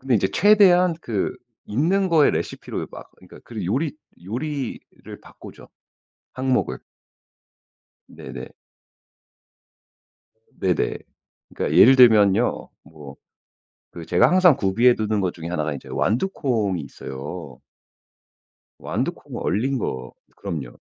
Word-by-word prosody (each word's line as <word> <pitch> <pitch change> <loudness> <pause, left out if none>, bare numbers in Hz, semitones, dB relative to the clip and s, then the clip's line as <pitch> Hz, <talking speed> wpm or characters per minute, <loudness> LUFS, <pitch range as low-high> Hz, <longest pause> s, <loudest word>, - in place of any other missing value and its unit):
근데 130 -1 0
이제 95 -3 +2
최대한 185 -4 +5
그 110 - -3 0.3
있는 180 - +1
거에 160 -4 +4
레시피로 - - -4
막 - - -12
그니까 90 - -16
그 110 -5 -6
요리 140 - -1 0.3
요리를 135 +5 -6
바꾸죠. - - -14 0.7
항목을. 130 0 -1 1.3
네네. - - -9 2.1
네네. 90 -2 0 0.6
그러니까 - - -1
예를 130 +4 +8
들면요. 110 -3 +4
뭐 75 -4 -13 0.8
그 85 -2 -9
제가 90 - +4
항상 180 -5 +5
구비해 115 +3 +3
두는 110 -2 -1
것 90 -2 -1
중에 85 -1 -7
1 80 -3 -2
가 75 -1 -3
이제 70 - -10
완두콩이 115 - -1
있어요. 70 0 -8 1.2
완두콩 - - -4
얼린 130 +8 -1
거 65 - -5 0.2
그럼요. 80 -11 -6
110 Hz, 225 characters per minute, -22 LUFS, 90-140 Hz, 2.1 s, 예를